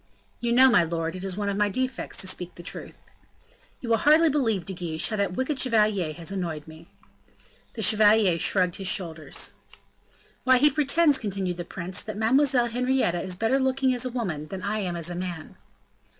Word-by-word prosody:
"You 235 -1 -1
know, 255 +2 +7
my 240 -8 +5
lord, 165 +1 -3
it 185 - -7
is 190 -1 -4
one 205 -1 -2
of 200 - -1
my 210 0 +2
defects 255 +5 -3
to 190 - -1
speak 180 -1 -3
the 175 - -10
truth." - - -7 0.7
"You 240 - -6
will 225 - +4
hardly 310 +6 +5
believe, 225 - 0
De 195 - -3
Guiche, 170 -3 0
how 220 - -2
that 200 -3 -1
wicked 260 +6 -2
chevalier 210 -8 +2
has 170 +3 -7
annoyed 170 -6 -4
me." 160 +1 -13 0.9
The 220 - -4
chevalier 210 -4 +4
shrugged 180 -1 +1
his 195 - -2
shoulders. 165 -5 -1 0.9
"Why, 260 0 +5
he 295 +4 +4
pretends," 295 0 +2
continued 190 -4 -3
the 175 - -5
prince, 185 +2 -5
"that 215 -2 -7
Mademoiselle 255 +3 +3
Henrietta 245 -7 0
is 185 -1 -4
better 225 +7 +1
looking 265 0 +1
as 245 - -1
a 255 - -2
woman 185 -12 -4
than 185 +2 -7
I 215 +2 -1
am 180 -4 -3
as 170 0 -2
a - - -5
man." 175 -3 -6
200 Hz, 195 wpm, -25 LUFS, 175-250 Hz, 0.9 s, know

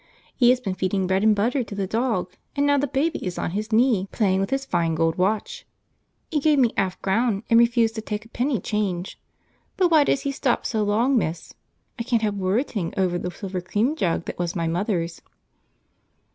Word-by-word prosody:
He 245 -2 +4
has 250 0 +4
been 200 -7 -3
feeding 190 +1 -1
bread 190 +1 +1
and 215 0 +4
butter 245 +6 +1
to 215 - -8
the 200 -1 -1
dog, 220 -3 -1 0.2
and 285 0 +1
now 285 0 +3
the 285 - 0
baby 285 +5 -1
is 180 -2 -4
on - - -2
his 210 +4 -4
knee, 220 -4 +3
playing 190 -4 +1
with 195 - -1
his 270 0 -1
fine 170 -7 0
gold 165 0 +1
watch. 200 +3 -1 0.7
He 305 - +1
gave 300 0 +3
me 245 -4 +3
a - - 0
'alf 190 -1 0
a - - -39
crown 210 +1 +1
and 230 - +7
refused 235 -1 +3
to 220 - -5
take 210 0 -5
a - - -17
penny 250 0 -1
change; 195 -3 -3 0.6
but 360 -2 +3
why 310 -2 +6
does 275 - +1
he 280 - -2
stop 265 -2 0
so 220 -2 0
long, 230 +5 +2
miss? 165 -4 -4 0.5
I - - -1
can't 230 -2 0
help 210 -1 +1
worriting 200 - -1
over 180 -2 +1
the 180 - -3
silver 185 0 -5
cream 215 - 0
jug 170 - -1
that - - -6
was 175 0 -2
my 170 -2 -1
mother's." 170 -1 -2
210 Hz, 215 wpm, -24 LUFS, 185-245 Hz, 0.7 s, and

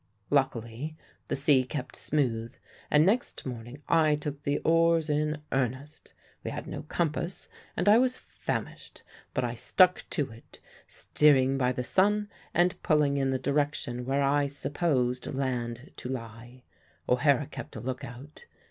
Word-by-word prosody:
"Luckily 135 +1 -1 0.3
the - - -1
sea 140 -1 +4
kept 130 +1 -5
smooth, 120 -6 -1 0.3
and 150 +1 +5
next 220 +6 0
morning 125 +3 -7
I 155 -2 +4
took 145 -1 -5
the 145 0 0
oars 165 -1 +3
in 150 0 -1
earnest. 135 +3 -3 0.3
We - - -3
had - - -5
no - - -5
compass, 170 +3 -2 0.3
and - - 0
I 215 +3 +8
was 255 0 +2
famished; - - -5 0.3
but 130 - +1
I 120 -1 -1
stuck 180 +10 +3
to 145 -7 -1
it, 115 +1 -15 0.3
steering 135 -3 +3
by 125 -2 +2
the 125 0 -3
sun 205 +7 +2 0.2
and 175 +1 +2
pulling 150 -3 +2
in 135 -1 +1
the 130 - +1
direction 140 -3 -1
where 135 +3 +1
I 140 +1 +2
supposed 135 -3 -1
land 125 -1 -3
to 125 - -6
lie. 120 0 -7 0.4
O'Hara 140 +3 +3
kept - - -9
a - - -5
look 125 +2 -4
out. 130 +5 -10
140 Hz, 150 wpm, -29 LUFS, 125-150 Hz, 0.4 s, I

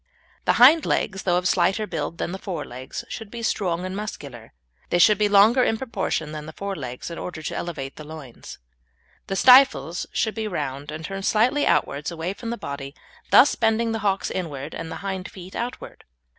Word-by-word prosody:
The - - +4
hind 290 +7 +7
legs, 190 -1 -1
though 175 -2 +2
of 180 0 0
slighter 190 +5 +2
build 170 -2 -4
than - - -3
the 190 - -5
fore 190 -3 -5
legs, 125 +2 -7
should 220 -3 -7
be 235 +1 -7
strong 180 -5 -1
and 185 0 -4
muscular. 140 - -7 0.4
They - - +2
should 205 +4 +5
be 210 -1 +3
longer, 215 +6 +6
in 225 - +1
proportion, 195 -10 -3
than 155 0 -7
the 160 - -8
fore 200 +2 -4
legs 125 +1 -6
in 170 - -6
order 170 -3 -6
to - - -4
elevate 145 -6 -5
the 155 - -8
loins. 150 -5 -10 0.7
The 195 - -2
stifles 250 -8 +5
should 220 - 0
be 220 -1 -3
round 145 -6 -4
and 155 +1 -6
turned 195 +1 -5
slightly 255 +7 +3
outwards, 145 +1 +1
away 170 +2 -4
from 230 +3 -7
the 235 - -3
body, 140 -3 -7 0.3
thus 280 - +7
bending 225 0 +1
the 225 - -2
hocks 200 -2 0
inward 150 -5 -5
and 165 0 -6
the - - -4
hind 190 -1 -4
feet 185 0 -11
outward. 240 +1 -6
185 Hz, 200 wpm, -24 LUFS, 155-220 Hz, 0.7 s, hind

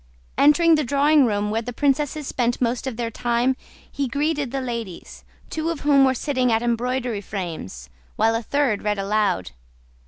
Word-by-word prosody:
Entering 330 +3 +5
the 305 -1 +3
drawing 285 +1 +4
room, 210 -1 -1
where 225 +1 0
the 245 - -6
princesses 290 +3 0
spent 245 -2 -1
most 245 +1 -1
of 245 -4 -4
their 235 -1 -3
time, 240 +3 0 0.4
he 280 -1 -2
greeted 290 +1 -1
the 270 +2 -3
ladies, 235 -8 -6 0.3
two 320 +1 -2
of 335 -3 -4
whom 280 -2 +5
were 260 0 +2
sitting 255 -2 0
at 225 +1 +1
embroidery 240 -1 -1
frames 165 - -6 0.3
while 225 +1 +2
a 230 - -1
third 250 -3 0
read 210 -1 -1
aloud. 200 - 0
245 Hz, 175 wpm, -23 LUFS, 220-280 Hz, 0.4 s, Entering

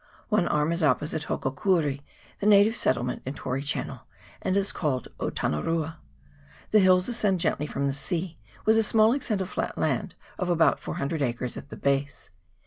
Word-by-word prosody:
One 210 -5 +2
arm 150 +2 +1
is 170 +1 0
op 145 -5 +3
posite 155 +1 -3
Hokokuri, 140 0 0 0.4
the 205 - 0
native 210 +2 +6
settlement 125 - +1
in 135 +3 -5
Tory 130 +1 -3
Channel, 145 0 -2 0.4
and 185 - 0
is 200 0 +1
called 135 -6 -2
Otanarua. 160 - -1 0.7
The 215 - +6
hills 185 -1 +5
ascend 210 -6 +1
gently 150 -2 0
from 140 -1 -2
the 135 - 0
sea, 170 +4 -2 0.3
with 220 +1 +5
a - - +3
small 220 +1 +4
extent 225 -7 -1
of 185 - -4
flat - - -3
land - - -1 0.2
of 180 - -1
about 165 -2 +3
400 145 +3 -3
acres 125 -1 -2
at - - -9
their - - -8
base. 140 0 -1
165 Hz, 175 wpm, -26 LUFS, 140-195 Hz, 0.7 s, native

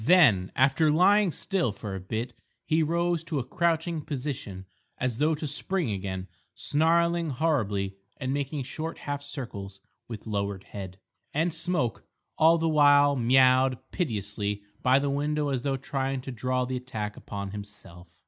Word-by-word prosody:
Then, 120 - +5
after 135 +4 +4
lying 190 +5 +5
still 180 - -1
for 100 0 -7
a 95 - -4
bit, 110 +6 -4 0.3
he 160 0 +2
rose 170 +1 +1
to 165 -3 -2
a 135 - 0
crouching 165 +2 0
position 130 -10 -5 0.3
as 125 -2 -2
though 155 +2 +3
to 155 - -5
spring 165 - -1
again, 95 -1 -4 0.3
snarling 170 +2 +2
horribly 110 -10 0 0.2
and 130 0 -2
making 140 0 -2
short 160 +5 -5
half 145 0 -4
circles 115 -9 -7 0.3
with 115 -3 -8
lowered 100 -3 -2
head. 95 -2 -8 0.4
And 165 +2 +1
Smoke 165 -7 -1 0.3
all 165 +1 +5
the 165 0 0
while 145 -2 +5
meowed 130 +1 +4
piteously 105 - -2 0.2
by 130 +1 +5
the 140 0 0
window 145 +1 0
as 130 -3 -1
though 135 +1 -1
trying 135 0 -2
to 135 - -6
draw 125 +2 -1
the 130 0 -3
attack 110 -5 -5
upon 100 -1 -6
himself. 95 -4 -11
135 Hz, 155 wpm, -27 LUFS, 105-155 Hz, 0.4 s, Then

